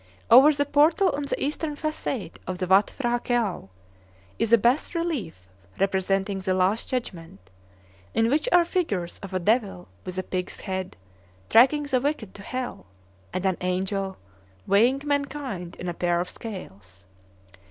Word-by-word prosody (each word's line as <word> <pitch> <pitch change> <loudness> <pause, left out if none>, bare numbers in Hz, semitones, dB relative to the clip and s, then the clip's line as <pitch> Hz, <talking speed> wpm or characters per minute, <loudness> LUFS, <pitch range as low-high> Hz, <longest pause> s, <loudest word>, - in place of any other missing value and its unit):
Over 265 +6 +9
the 285 -1 0
portal 310 +7 +4
on 285 0 -3
the - - -3
eastern 300 +1 -2
facade 290 - -4
of 185 - -3
the 185 - -2
Watt 190 +3 +4
P'hra 240 -3 0
Këau 225 - -1 0.7
is 230 - 0
a 235 - +8
bass 245 - +1
relief 285 - -3 0.3
representing 195 +1 0
the 190 -1 0
Last 185 +4 +1
Judgment, 165 - -5 0.6
in 225 0 +3
which 300 - +1
are 350 -1 +6
figures 215 - -2
of 195 -2 -9
a 185 - 0
devil 205 -2 0
with 185 0 -7
a 185 - -1
pig's 180 0 -4
head 190 - -4 0.5
dragging 270 +6 +5
the 265 -3 0
wicked 280 -8 -2
to 200 - -11
hell, 250 - -5 0.4
and 185 - -3
an 190 -2 +1
angel 190 +1 -2 0.5
weighing 240 +8 +3
mankind 280 -11 -3
in 180 - -7
a 175 - -2
pair 175 0 0
of 180 +1 -3
scales. 100 - -10
210 Hz, 155 wpm, -25 LUFS, 185-280 Hz, 0.7 s, Over